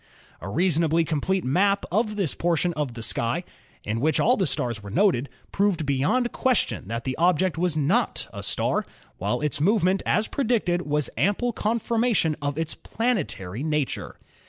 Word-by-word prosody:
A 85 - -7
reasonably 165 - +2
complete 165 +4 0
map 200 +9 +2
of 215 +2 +1
this 195 -8 0
portion 175 0 0
of 145 -6 -3
the 115 - -6
sky, - - 0 0.4
in 110 +2 -2
which 155 +5 +2
all 250 - +4
the 190 -7 0
stars 120 -4 -2
were 100 - -9
noted, 145 - +2 0.2
proved 195 -6 +1
beyond 190 - +1
question 255 - 0
that 115 +2 -3
the 130 -1 -2
object 180 +1 +2
was 170 -1 0
not 175 - +1
a - - -6
star, - - 0 0.4
while - - -1
its 150 -1 0
move 205 +5 +3
ment 185 +2 +2
as 215 - +1
predicted 220 -9 0
was 150 -1 0
ample 205 - +1
confirmation 225 -6 +1
of 145 0 -2
its 160 0 -2
planetary 160 - -2
nature. 150 -2 -2
170 Hz, 165 wpm, -25 LUFS, 145-205 Hz, 0.4 s, all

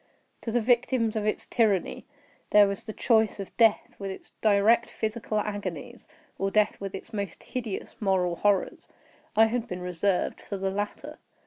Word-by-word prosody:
To 230 - -4
the 240 +1 +2
victims 235 -1 +2
of 215 -1 -1
its 215 - -1
tyranny, 210 -7 0 0.4
there 205 -1 +7
was 200 0 -4
the 220 - -5
choice 220 -1 +2
of 195 - -7
death 225 -3 +3
with 195 -1 -4
its 190 - -9
direst 215 +2 +4
physical 220 -1 -3
agonies, 205 -6 -5 0.3
or 195 - +1
death 210 +1 +1
with 195 -1 -4
its 225 - -9
most 200 -4 -4
hideous 230 -6 -5
moral 185 -4 +1
horrors. 205 -2 +1 0.5
I 220 +1 +7
had 235 +1 -1
been 180 0 -5
reserved 180 +1 -1
for 200 - -5
the 190 0 -1
latter. 205 +1 -5
205 Hz, 165 wpm, -27 LUFS, 195-225 Hz, 0.5 s, there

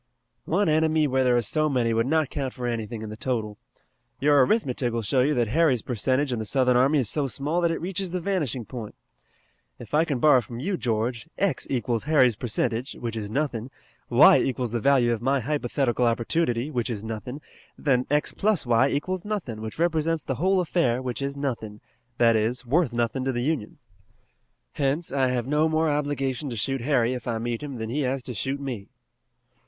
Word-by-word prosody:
"One 195 +4 +1
enemy 155 0 +3
where 130 -2 +1
there 125 -1 +3
are 120 - +1
so 155 +5 +2
many 120 -4 +1
would 115 +2 +1
not 155 -1 +1
count 135 -3 -3
for 125 - -5
anything 115 -2 -3
in 110 - -6
the - - -6
total. 110 -3 -3 0.6
Your 145 -1 +5
arithmetic 130 - 0
will 115 0 -2
show 125 +6 +2
you 145 +4 +2
that 120 -3 +1
Harry's 140 -4 +2
percentage 130 +4 0
in 120 - -2
the 110 - -3
Southern 125 +1 +2
army 135 +5 +4
is 130 -6 +2
so 145 +5 0
small 145 +7 -2
that 170 - +2
it 165 - -2
reaches 185 +1 -3
the 180 +1 -2
vanishing 155 - -2
point. 115 -1 -8 0.8
If 120 +1 -12
I 155 +2 +4
can 150 -5 -1
borrow 130 0 +5
from 120 0 -8
you, 185 +9 -1
George, 115 +1 -2
x 195 -9 0
equals 120 -2 -1
Harry's 130 -7 +4
percentage, 120 +3 -2
which 115 -2 -5
is 105 -2 -4
nothing, 130 -2 -2 0.4
y - - +7
equals 125 -3 -1
the 120 - -1
value 125 -2 +3
of 115 - -4
my 135 +2 +1
hypothetical 125 -2 0
opportunity, 120 +2 0
which 120 -4 -2
is 110 -3 -4
nothing, 115 +5 -6 0.4
then 130 -3 +1
x 150 +1 +1
plus 210 -7 +1
y 120 +3 +3
equals 180 +6 -2
nothing, 170 - -4
which 110 0 -6
represents 165 -2 0
the 135 - -2
whole 190 +1 +3
affair, 145 -8 +1
which 130 0 -4
is 140 0 -3
nothing, 115 -7 -4 0.4
that 115 -1 +4
is, 115 +4 0
worth 145 +2 +2
nothing 120 +2 -1
to 135 - 0
the 120 -1 -2
Union. 140 -7 -2 0.9
Hence 145 +4 -1
I 135 -2 +2
have 125 -2 -1
no 150 +3 +2
more 160 0 +1
obligation 145 -2 -2
to 120 - -5
shoot 135 +4 -1
Harry 125 -2 +2
if 125 -1 -6
I 115 -2 -1
meet 115 0 -3
him 145 -3 -6
than 110 0 -4
he 150 +4 -1
has 130 -1 -1
to 125 - -5
shoot 135 +6 -2
me." 125 -8 -6
130 Hz, 205 wpm, -25 LUFS, 120-150 Hz, 0.9 s, y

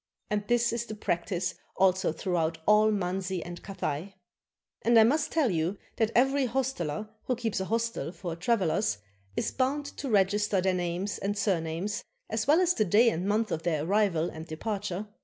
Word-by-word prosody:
And 210 -1 +1
this 235 -1 +2
is 235 0 -2
the 215 - -6
practice 180 -2 -1 0.2
also 190 -1 +3
throughout 165 -1 -1
all 210 +1 +5
Manzi 190 -2 -1
and 175 0 -7
Cathay. 190 -1 -4 0.7
And 235 0 +4
I 220 - +9
must 300 +7 +2
tell 300 -9 +2
you 170 +3 0 0.2
that 220 -1 +2
every 270 +2 +3
hosteler 220 - -2 0.2
who 250 - 0
keeps 225 -4 -2
an 190 - -3
hostel 230 -9 -1
for 175 -3 -5
travelers 180 - +1 0.4
is - - 0
bound 275 +3 0
to 275 - -4
register 205 -1 +2
their 190 0 +2
names 180 +3 -2
and 205 +1 -2
surnames, 190 +2 -1 0.3
as 220 +1 -1
well 310 +5 +5
as 360 -1 +3
the 220 - +2
day 215 +5 +5
and 180 +2 -2
month 215 0 +1
of 160 - -1
their 160 -3 0
arrival 190 -4 +2
and 160 +1 -8
departure. 200 +3 -3
200 Hz, 175 wpm, -29 LUFS, 175-230 Hz, 0.7 s, I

